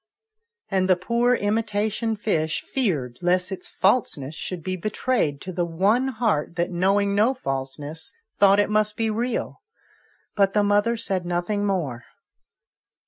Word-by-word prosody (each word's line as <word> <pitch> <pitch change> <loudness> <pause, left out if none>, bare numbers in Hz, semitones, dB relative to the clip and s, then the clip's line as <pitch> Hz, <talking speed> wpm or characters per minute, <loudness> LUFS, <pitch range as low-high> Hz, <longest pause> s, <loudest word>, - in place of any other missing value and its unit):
And 190 -1 +1
the 185 - +6
poor 235 +7 +1
imitation 215 +1 -1
fish 160 -7 -1
feared 150 - -1
lest 180 +2 +1
its 190 - -6
falseness 175 - +1
should 170 +1 -5
be 185 0 -2
betrayed 205 - -1
to 185 - -6
the 175 0 0
one 195 +10 +2
heart 220 - -1
that, 170 +2 -1
knowing 200 +3 +2
no 220 +6 +3
falseness, 145 - -4 0.3
thought 200 0 +6
it 205 - +2
must 210 0 +1
be 225 -1 0
real; 235 +2 -2 0.7
but 195 -1 +3
the 210 - +3
mother 205 +3 +2
said 190 -5 -1
nothing 175 +4 -1
more. 145 -12 -2
195 Hz, 140 wpm, -24 LUFS, 175-215 Hz, 0.7 s, the